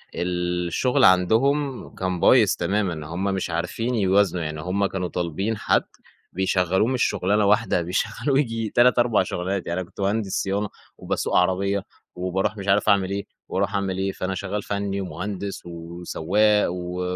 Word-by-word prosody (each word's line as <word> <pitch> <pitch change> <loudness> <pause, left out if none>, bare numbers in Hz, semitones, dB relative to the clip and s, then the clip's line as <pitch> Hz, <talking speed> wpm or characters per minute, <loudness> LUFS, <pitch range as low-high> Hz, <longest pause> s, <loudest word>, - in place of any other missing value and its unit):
الشغل 90 +8 0
عندهم 125 +10 +2
كان 95 -1 -2
بايظ - - +5
تمامًا، 90 -5 -1
هم 85 +4 -4
مش 95 -2 -1
عارفين 90 +9 -2
يوازنوا 95 -4 +2
يعني 75 0 -4
هم 95 +4 0
كانوا 95 -2 -2
طالبين 90 +6 -2
حد - - +1 0.5
بيشغلوه 95 +2 +1
مش 130 -1 +1
شغلانة 105 +1 +1
واحدة 105 -2 +2
بيشغلوه 105 - -1
ييجي 115 -5 -1
3، 125 +2 +4
4 120 -5 +3
شغلانات 95 +1 -3
يعني 85 +2 -1
أنا 90 - -9
كنت - - -9
مهندس 100 0 0
صيانة، 100 +1 -1 0.3
وباسوق - - -2
عربية، 95 +2 +1 0.3
وباروح 95 +3 -1
مش 100 0 -6
عارف 100 +2 +3
أعمل 100 -2 +3
إيه، 100 0 -3 0.2
وأروح 100 +1 -1
أعمل 95 -2 -1
إيه، 95 0 -1
فأنا 95 0 -3
شغال 100 +2 -3
فنّي 100 -1 -2
ومهندس 95 +3 -5
وسواق 85 +5 0
و 90 0 -4
95 Hz, 155 wpm, -24 LUFS, 90-105 Hz, 0.5 s, بايظ